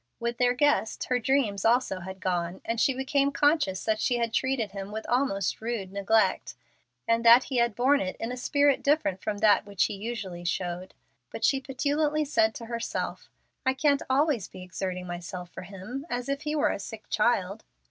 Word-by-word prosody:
With 235 0 -3
their 245 0 +3
guest, 290 -5 +1
her 250 -1 +2
dreams 235 -6 +1
also 230 -4 +2
had 190 +1 -8
gone, 175 -1 -1
and 230 0 -1
she 270 - +3
became 275 +1 +1
conscious 290 - +2
that 220 -1 +1
she 245 +1 +1
had 230 -1 -1
treated 250 -5 0
him 195 0 -7
with 220 +1 -5
almost 220 -8 0
rude 220 -5 -3
neglect, 200 +3 +1 0.5
and 230 0 +2
that 235 +2 +8
he 260 - -3
had 235 -3 +2
borne 270 +5 +3
it 185 -1 -3
in 225 +2 -3
a - - -3
spirit 285 +2 +2
different 280 -11 +1
from 215 -1 -2
that 210 0 +4
which 200 -2 +1
he - - 0
usually 200 -4 -5
showed. 175 +1 -3 0.3
But - - -2
she 270 -2 +2
petulantly 295 +3 0
said 220 -6 +2
to 230 - -7
herself, 235 0 -4 0.3
"I 260 0 +1
can't 285 0 +2
always 270 - +2
be 185 - -11
exerting 180 0 -4
myself 175 0 -7
for - - -8
him 200 - -8
as 245 +1 -3
if 280 +1 -1
he 300 0 -2
were 295 - +2
a - - -4
sick 215 +2 -9
child." 210 -2 +1
230 Hz, 195 wpm, -27 LUFS, 195-265 Hz, 0.5 s, that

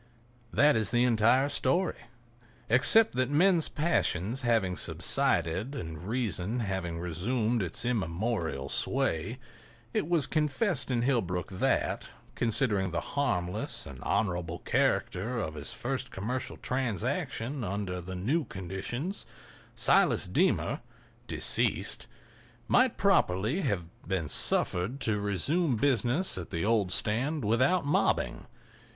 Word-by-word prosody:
That 145 +2 +4
is 110 -1 +2
the 120 0 +2
entire 125 +3 +3
story—except 120 - +1
that 130 0 0
men's 170 +3 +3
passions 130 - 0
having 115 -7 +1
subsided 95 - 0
and 80 - -7
reason 110 -1 -2
having 95 -5 -3
resumed 110 +8 -1
its 90 +5 -1
immemorial 95 - -2
sway, 80 - -1 0.6
it 155 - -1
was 165 -6 +3
confessed 150 - 0
in 120 -2 0
Hillbrook 95 -9 0
that, 95 - 0 0.3
considering 110 -4 +1
the 85 - -2
harmless 100 -8 -1
and 65 -3 -10
honorable 90 -5 -1
character 105 +7 0
of 95 -9 -3
his 75 -2 -5
first 130 0 -4
commercial 125 +7 -4
transaction 125 - -2
under 95 -2 -3
the 95 +2 -7
new 130 - 0
conditions, 100 - -4 0.5
Silas - - +3
Deemer, - - +1 0.5
deceased, - - +1 0.6
might 255 -1 +3
properly 130 - +2
have 100 - -1 0.2
been 95 -5 -1
suffered 90 - +2
to 105 -2 0
resume 125 - 0
business 125 - +1
at 85 - -7
the 85 +3 -2
old 105 -4 +2
stand 130 +8 -1
without 130 - +2
mobbing. 145 - 0
115 Hz, 115 wpm, -29 LUFS, 95-130 Hz, 0.6 s, That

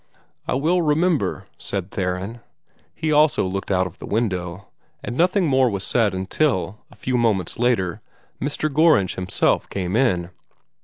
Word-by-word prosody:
"I - - 0
will 165 +7 +2
remember," 160 +1 +1
said 95 -1 -4
Theron. 95 +5 -3 0.6
He 155 - -1
also 150 -7 +4
looked 95 +1 -4
out 95 -1 +2
of 90 0 -9
the - - -8
window; 95 -4 -2 0.4
and 120 - -4
nothing 180 +4 +2
more 130 -4 +3
was 100 -3 -3
said 110 -6 +1
until, 95 - -1
a - - -17
few 125 -1 -1
moments 110 -6 0
later, 115 -8 +1 0.4
Mr. 145 +2 -1
Gorringe 155 - +4
himself 95 0 0
came 95 0 -3
in. 95 -9 +1
110 Hz, 150 wpm, -22 LUFS, 95-145 Hz, 0.6 s, also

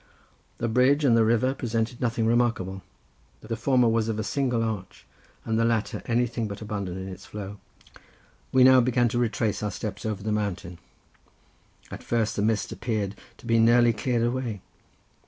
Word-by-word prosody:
The 120 - -2
bridge 130 +6 +3
and 120 -4 +5
the 115 - +5
river 120 +4 +2
presented 115 -2 -2
nothing 115 -2 0
remarkable. 115 -5 +1 0.6
The 115 +1 -4
former 125 +1 +2
was 115 0 +1
of 110 - -2
a 110 - -2
single 125 0 0
arch; 105 -5 -5 0.4
and 110 0 0
the - - +3
latter 115 -2 0
anything 120 -1 0
but 100 0 -7
abundant 100 -4 -4
in 95 0 -6
its 95 -1 -9
flow. 100 -1 -7 0.9
We 130 -1 +5
now 130 0 +7
began 120 -1 +2
to 120 +1 -1
retrace 115 -2 0
our 105 - -1
steps 105 +4 -6
over 105 -3 -3
the 110 - -2
mountain. 95 -5 -3 1.1
At - - -7
first 115 -2 -1
the - - -1
mist 110 0 0
appeared 105 -4 -2 0.2
to - - -16
be 115 -1 +3
nearly 120 +1 +5
cleared 115 +2 -1
away. 120 -4 -2
115 Hz, 175 wpm, -26 LUFS, 105-120 Hz, 1.1 s, now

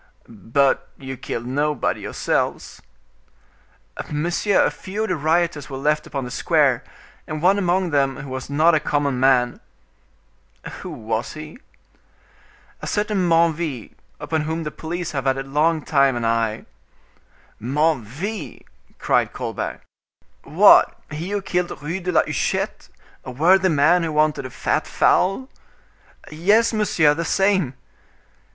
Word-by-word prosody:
"But 115 +6 0
you 135 -1 -7
killed 120 -1 -5
nobody 145 +2 -1
yourselves?" - - -2 1.3
"Monsieur, 175 +6 +1
a - - +1
few 205 +3 -5
of 220 - -3
the 185 - +1
rioters 160 -1 0
were 135 - -5
left 150 +2 0
upon 135 -2 -4
the 125 - -7
square, - - +2 0.4
and 155 0 -4
one 190 +5 +3
among 180 -1 0
them 135 -2 +1
who 140 - -8
was 130 0 -6
not 155 +4 +4
a 160 - +4
common 145 -3 -1
man." 125 -2 +3 1.2
"Who - - -7
was 110 +1 -4
he?" 155 +7 -10 1.2
"A - - -6
certain 205 -4 0
Menneville, 165 -7 +1 0.3
upon 160 -1 -2
whom 160 +2 -3
the 150 - -4
police 170 +2 -5
have 135 -3 -3
a 135 0 +1
long 150 +3 +1
time 140 -3 +3
had 120 - -3
an - - 0
eye." 115 -1 0 1.0
"Menneville!" 150 - -2 0.3
cried - - +1
Colbert, - - -5 0.6
"what, - - +5
he 160 +5 -5
who 205 -1 -2
killed 180 -5 -2
Rue 165 +6 -4
de 180 0 -3
la 170 - +4
Huchette, - - -2 0.3
a - - -8
worthy 185 +9 +3
man 160 +3 +4
who 165 -2 -2
wanted 150 -3 +1
a - - -12
fat - - -1
fowl?" 195 +8 +2 0.8
"Yes, 205 +10 +3
monsieur; 170 -8 +3
the 165 +3 -3
same." 190 -6 +1
155 Hz, 140 wpm, -21 LUFS, 135-175 Hz, 1.3 s, what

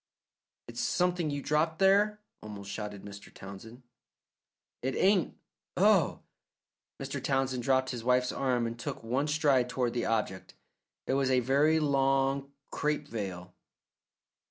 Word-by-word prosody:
"It's - - -5
something 180 -3 +1
you 145 -1 -3
dropped 155 +2 +1
there," 205 +3 +3 0.2
almost 100 -2 -8
shouted 105 -2 -6
Mr. 100 0 -11
Townsend. 110 +6 -11 1.0
"It 130 +1 -2
ain't. 195 -2 +2 0.4
Oh!" - - +3 0.8
Mr. - - -5
Townsend 135 -2 0
dropped 130 +1 +1
his 120 -3 -5
wife's 125 +1 +2
arm 125 -3 0
and 115 0 -5
took 115 - -5
one 130 +6 0
stride 145 -5 +2
toward 125 -2 -1
the 120 - -1
object. 105 -4 -2 0.5
It - - -1
was 135 -1 +1
a 130 -1 +4
very 140 +6 +3
long 135 -1 +1 0.2
crape 150 0 -1
veil. 90 -5 -5
130 Hz, 130 wpm, -30 LUFS, 115-150 Hz, 1.0 s, a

